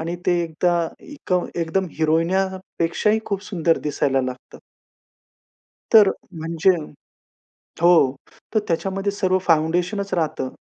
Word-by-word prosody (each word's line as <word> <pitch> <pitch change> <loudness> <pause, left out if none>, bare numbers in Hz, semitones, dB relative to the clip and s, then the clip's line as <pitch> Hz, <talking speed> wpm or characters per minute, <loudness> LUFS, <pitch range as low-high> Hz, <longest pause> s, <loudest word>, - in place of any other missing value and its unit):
आणि 165 +2 -3
ते 175 -1 +3
एकदा 170 +2 0 0.3
एका 235 -11 -2 0.2
एकदम 170 +3 0
हिरोईन्यापेक्षा 175 +3 0
ही 220 - +2
खूप 200 -1 -3
सुंदर 170 -5 +1
दिसायला 140 -2 0
लागतं. 130 0 -7 1.4
तर 210 -3 +8 0.3
म्हणजे 165 +3 +1 1.1
हो. 165 -6 +5 0.4
तर - - +5
त्याच्यामध्ये 195 +4 -1
सर्व 185 -2 +1
फाउंडेशनचं 175 +5 +1
राहतं. 155 -5 -1
175 Hz, 105 wpm, -22 LUFS, 160-195 Hz, 1.4 s, तर